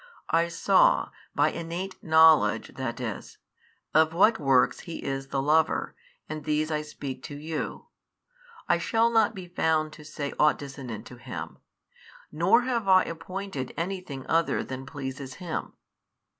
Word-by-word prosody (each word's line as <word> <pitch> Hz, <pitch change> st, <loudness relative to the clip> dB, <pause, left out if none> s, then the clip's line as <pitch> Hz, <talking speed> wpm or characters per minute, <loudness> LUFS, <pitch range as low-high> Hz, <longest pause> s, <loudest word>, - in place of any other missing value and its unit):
I 165 Hz, +1 st, +3 dB
saw, -, -, +3 dB, 0.2 s
by -, -, +3 dB
innate 170 Hz, +3 st, -5 dB
knowledge 160 Hz, -1 st, +5 dB
that -, -, -4 dB
is, -, -, -6 dB, 0.6 s
of 160 Hz, +1 st, +4 dB
what 220 Hz, +5 st, +5 dB
works 130 Hz, -4 st, +3 dB
He 170 Hz, -, -7 dB
is 135 Hz, 0 st, -3 dB
the 135 Hz, 0 st, -1 dB
Lover, 155 Hz, +2 st, +2 dB, 0.3 s
and 155 Hz, -1 st, -6 dB
these 155 Hz, +1 st, 0 dB
I 150 Hz, -1 st, 0 dB
speak 140 Hz, -3 st, -7 dB
to 145 Hz, -, -7 dB
you, 155 Hz, +2 st, -5 dB, 0.8 s
I -, -, +3 dB
shall 230 Hz, 0 st, +2 dB
not 225 Hz, -1 st, +3 dB
be 185 Hz, -2 st, -8 dB
found 160 Hz, -3 st, 0 dB
to 150 Hz, -, -12 dB
say 145 Hz, -1 st, -5 dB
ought 150 Hz, 0 st, +5 dB
dissonant 130 Hz, -6 st, -7 dB
to 125 Hz, +2 st, -11 dB
Him, 120 Hz, -, -7 dB, 0.7 s
nor 190 Hz, +10 st, +4 dB
have 240 Hz, -5 st, -1 dB
I 185 Hz, -1 st, +6 dB
appointed 180 Hz, -4 st, -6 dB
any 185 Hz, +3 st, -2 dB
thing 140 Hz, -7 st, -8 dB
other 165 Hz, 0 st, +1 dB
than 130 Hz, 0 st, -7 dB
pleases 135 Hz, -2 st, -6 dB
Him. 175 Hz, -3 st, -5 dB
160 Hz, 150 wpm, -27 LUFS, 140-180 Hz, 0.8 s, I